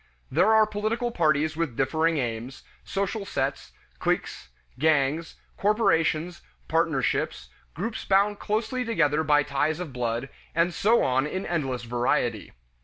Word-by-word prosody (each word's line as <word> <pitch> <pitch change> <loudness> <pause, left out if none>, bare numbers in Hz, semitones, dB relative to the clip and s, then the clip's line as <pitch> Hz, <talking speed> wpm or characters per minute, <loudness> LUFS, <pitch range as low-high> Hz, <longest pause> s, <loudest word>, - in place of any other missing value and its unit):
There 170 +10 +4
are 220 0 +6
political 215 +3 -2
parties 155 -4 +1
with 160 -7 -2
differing 160 +4 +1
aims, 120 0 -4 0.2
social 200 +2 -2
sets, 135 -7 -3 0.3
cliques, - - -2 0.3
gangs, 155 +1 +1 0.2
corporations, 175 -5 +1 0.3
partnerships, - - 0 0.3
groups 215 +8 -4
bound 200 +1 +2
closely 220 +4 -1
together 160 -10 +1
by 150 -1 +4
ties 150 +3 0
of 170 -7 -6
blood, 120 +1 -2 0.3
and 170 +1 +2
so 225 +7 +3
on 130 +2 +1
in 185 +5 -4
endless 135 -8 -2
variety. 120 -2 -1
160 Hz, 125 wpm, -26 LUFS, 135-200 Hz, 0.3 s, are